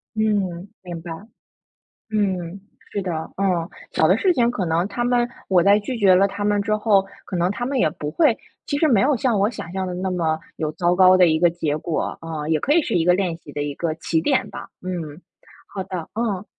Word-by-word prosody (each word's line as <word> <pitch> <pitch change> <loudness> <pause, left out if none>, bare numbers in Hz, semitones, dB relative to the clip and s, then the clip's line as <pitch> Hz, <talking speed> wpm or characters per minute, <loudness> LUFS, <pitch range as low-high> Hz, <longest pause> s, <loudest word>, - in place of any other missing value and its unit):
嗯， 200 -4 0
明 175 -3 -7
白。 170 0 -8 1.0
嗯， 190 -3 -1 0.3
是 200 - -2
的。 180 -2 -3 0.3
嗯， 180 -4 +1 0.2
小 - - +3
的 - - +4
事 370 -3 +3
情 240 -4 +2
可 190 -6 -2
能 170 +3 +1
他 225 +4 -3
们 240 0 +2 0.2
我 185 -2 +4
在 200 +2 +5
拒 235 +4 -4
绝 190 -4 +5
了 195 +2 +4
他 200 +1 -5
们 205 -1 +2
之 215 +1 0
后， 205 -3 +3 0.2
可 185 - -6
能 175 +2 +1
他 240 +3 -4
们 270 0 -1
也 155 - +3
不 150 -1 -6
会 295 -9 +3 0.3
其 285 - -1
实 315 - +3
没 225 -8 +4
有 280 +1 +3
像 245 -5 +1
我 205 +2 +3
想 175 -7 -8
象 190 -1 -2
的 180 - -4
那 190 +1 -2
么 160 -3 0 0.2
有 155 -1 -2
糟 175 0 +1
糕 185 0 +6
的 180 -2 +6
一 160 0 +2
个 175 -1 +5
结 155 -3 -2
果。 160 +1 -3
啊， 160 -2 -5
也 160 -1 +2
可 290 - +1
以 335 - +5
是 235 - -3
一 165 - +3
个 180 +1 +4
练 180 -3 0
习 150 - -13
的 145 0 -3
一 145 -1 -3
个 165 -2 -2
起 165 0 -1
点 - - +1
吧。 - - -9
嗯， 175 -3 -5 0.5
好 190 -2 -5
的。 180 -4 -6
嗯。 210 -3 -2
185 Hz, 250 characters per minute, -22 LUFS, 170-210 Hz, 1.0 s, 糕